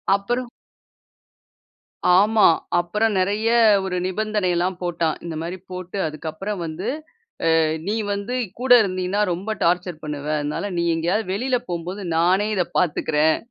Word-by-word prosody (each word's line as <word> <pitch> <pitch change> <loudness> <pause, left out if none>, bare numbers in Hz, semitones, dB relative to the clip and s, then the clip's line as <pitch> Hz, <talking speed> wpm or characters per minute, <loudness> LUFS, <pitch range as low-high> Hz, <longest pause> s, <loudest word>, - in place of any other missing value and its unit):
அப்புறம் 240 +5 -2 1.7
ஆமா, 215 +2 +5 0.3
அப்புறம் 210 +5 0
நெறைய 205 +4 0 0.4
ஒரு 185 -1 -2
நிபந்தனைல்லாம் 185 -3 0
போட்டான். 170 -3 -1
இந்த 165 -2 -5
மாரி 175 +3 -4
போட்டு 185 +1 -6
அதுக்கப்புறம் 160 +6 -5
வந்து 165 +7 -5 0.7
அ - - +4 0.3
நீ 210 - 0 0.2
வந்து 200 +5 -3 0.3
கூட 255 0 +3
இருந்தினா 185 +1 -1
ரொம்ப 190 +6 -4
டார்ச்சர் 175 -1 0
பண்ணுவ. 150 -1 -5
அதனால 150 +7 -3
நீ 170 - +1
எங்கயாவது 185 +5 -1
வெளில 250 +4 0
போம்போது 175 +4 -4
நானே 185 +5 +3
இத 180 - +2
பாத்துக்கறேன். 155 -2 +2
185 Hz, 125 wpm, -22 LUFS, 170-210 Hz, 1.7 s, ஆமா